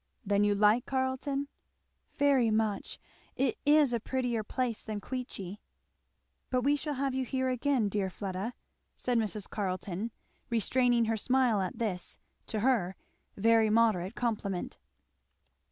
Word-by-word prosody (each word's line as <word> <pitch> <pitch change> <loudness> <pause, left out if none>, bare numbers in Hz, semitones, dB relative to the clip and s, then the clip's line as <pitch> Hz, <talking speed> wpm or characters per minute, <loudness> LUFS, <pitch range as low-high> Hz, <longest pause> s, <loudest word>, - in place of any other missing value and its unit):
"Then 205 0 +3
you 205 0 +3
like 210 +4 +4
Carleton?" 270 +1 -1 0.7
"Very 275 -5 +4
much! 215 -2 -1 0.4
It 270 - 0
is 295 -4 +5
a 235 - +1
prettier 245 -1 -1
place 240 +1 -2
than 215 -2 -4
Queechy." 210 -6 -6 0.9
"But 250 -1 +1
we 285 +2 +4
shall 290 0 -3
have 270 0 -1
you 260 0 0
here 260 +1 -1
again, 255 -2 +1
dear 200 -1 -1
Fleda," 195 +5 -4 0.4
said 245 -2 0
Mrs. 215 -2 -3
Carleton 190 +1 -3 0.4
restraining 240 +1 +3
her 225 0 0
smile 250 -2 +2
at 185 - -3
this, 195 -6 -3 0.3
to 215 -2 -2
her, 215 -7 +2 0.4
very 225 +1 +4
moderate 215 -3 +2
complement. 205 -6 -2
230 Hz, 135 wpm, -31 LUFS, 205-260 Hz, 0.9 s, is